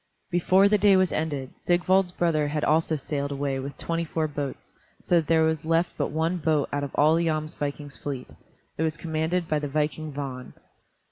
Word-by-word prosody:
Before 185 +3 +4
the 210 0 +3
day 200 -1 +6
was 185 -2 +2
ended, 145 -4 -2
Sigvald's 180 +1 +2
brother 165 -4 +1
had 150 +1 -2
also 160 +1 +2
sailed 140 0 -3
away 140 -1 -2
with 140 +2 -6
twenty 165 0 -2
four 160 -1 -1
boats, 145 -2 -6 0.3
so 175 - +2
that 160 -3 +1
there 160 -1 +4
was 160 0 0
left 165 +2 +1
but - - -1
one 160 +4 0
boat 155 -3 +1
out 145 0 -1
of 140 - -3
all 150 +2 +5
the 165 +1 +2
Jomsvikings' 150 -2 -3
fleet. 140 -4 -5 0.5
It - - 0
was 160 -1 0
commanded 160 +2 -1
by 155 -2 +1
the 145 - -3
viking 155 +2 -2
Vagn. 135 -3 -6
155 Hz, 195 wpm, -26 LUFS, 145-165 Hz, 0.5 s, day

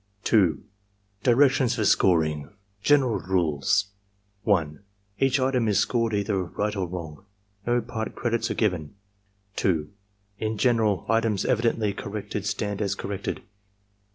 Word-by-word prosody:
2. 90 -9 +3 0.6
DIRECTIONS 130 0 +4
FOR 110 -3 0
SCORING 80 -7 +2 0.3
General 135 -3 +3
Rtiles 90 +1 +1 0.6
1. 80 -8 +1 0.4
Each 135 0 +3
item 130 -3 +1
is 105 -3 +2
scored 115 0 +1
either 100 -2 0
right 105 +4 -3
or 95 -2 -1
wrong. 85 -1 -7 0.4
No 120 0 +2
part 110 -1 -5
credits 115 -1 -1
are - - -2
given. 90 -9 -1 0.6
2. 80 -5 0 0.5
In 110 0 -2
general, 110 -5 +2
items 115 -2 +1
evidently 110 -2 +1
corrected 105 -1 -5
stand 100 0 -2
as 100 -1 0
corrected. 100 -1 -4
105 Hz, 125 wpm, -25 LUFS, 95-115 Hz, 0.6 s, DIRECTIONS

